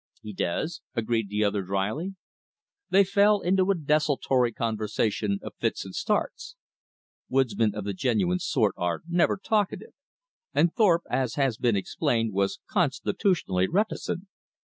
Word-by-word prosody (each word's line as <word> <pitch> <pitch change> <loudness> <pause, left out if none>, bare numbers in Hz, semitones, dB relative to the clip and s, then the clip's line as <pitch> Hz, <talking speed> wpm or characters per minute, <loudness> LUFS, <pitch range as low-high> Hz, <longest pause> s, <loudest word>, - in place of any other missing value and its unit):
"He 105 - -7
does," 125 - -2
agreed 115 -2 0
the 105 +1 0
other 100 -1 +1
dryly. 100 - -2 0.7
They 200 +1 +6
fell 200 +1 +3
into 185 +2 +2
a 195 - +4
desultory 145 -5 +1
conversation 110 -2 -1
of - - -7
fits - - -1
and 95 - -9
starts. 225 - -2 0.7
Woodsmen 115 -5 +1
of 105 - -4
the 100 0 -3
genuine 95 -5 +1
sort - - +1
are 90 -1 -2
never 175 0 +2
talkative; 205 0 -1 0.6
and 170 0 +3
Thorpe, 180 -7 +3
as 130 -4 0
has 135 -6 +1
been 120 -3 +2
explained, 115 - 0
was 100 +5 0
constitutionally 155 - +1
reticent. 200 -1 -1
125 Hz, 135 wpm, -27 LUFS, -, 0.7 s, They